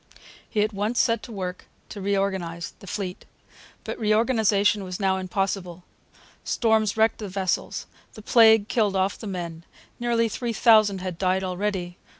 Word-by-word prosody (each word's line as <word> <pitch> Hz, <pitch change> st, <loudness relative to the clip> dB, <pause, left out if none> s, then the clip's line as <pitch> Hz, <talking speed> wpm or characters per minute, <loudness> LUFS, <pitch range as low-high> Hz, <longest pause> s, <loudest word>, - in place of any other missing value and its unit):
He 210 Hz, -3 st, +1 dB
at 215 Hz, +1 st, -2 dB
once 210 Hz, +4 st, -1 dB
set 230 Hz, -1 st, +2 dB
to 240 Hz, -, -10 dB
work 185 Hz, -3 st, -5 dB, 0.2 s
to 205 Hz, -, -7 dB
reorganize 190 Hz, -4 st, -2 dB
the 195 Hz, -, -13 dB
fleet. 185 Hz, -1 st, -5 dB, 0.6 s
But -, -, -6 dB
reorganization 215 Hz, -2 st, +2 dB
was 185 Hz, -1 st, -6 dB
now 190 Hz, -1 st, +1 dB
impossible. 185 Hz, -1 st, -3 dB, 0.6 s
Storms 220 Hz, -3 st, +1 dB
wrecked 220 Hz, +1 st, +3 dB
the 210 Hz, -3 st, -5 dB
vessels. 190 Hz, -1 st, -2 dB, 0.3 s
The 215 Hz, -, -11 dB
plague 220 Hz, -3 st, +6 dB
killed 215 Hz, -5 st, +1 dB
off 190 Hz, +1 st, 0 dB
the 220 Hz, -, -7 dB
men: 170 Hz, -4 st, -5 dB, 0.4 s
nearly 235 Hz, -1 st, +1 dB
three 235 Hz, +2 st, -3 dB
thousand 215 Hz, -4 st, +4 dB
had 180 Hz, -2 st, -5 dB
died 185 Hz, 0 st, +1 dB
already. 185 Hz, -1 st, -3 dB
200 Hz, 155 wpm, -25 LUFS, 185-220 Hz, 0.6 s, plague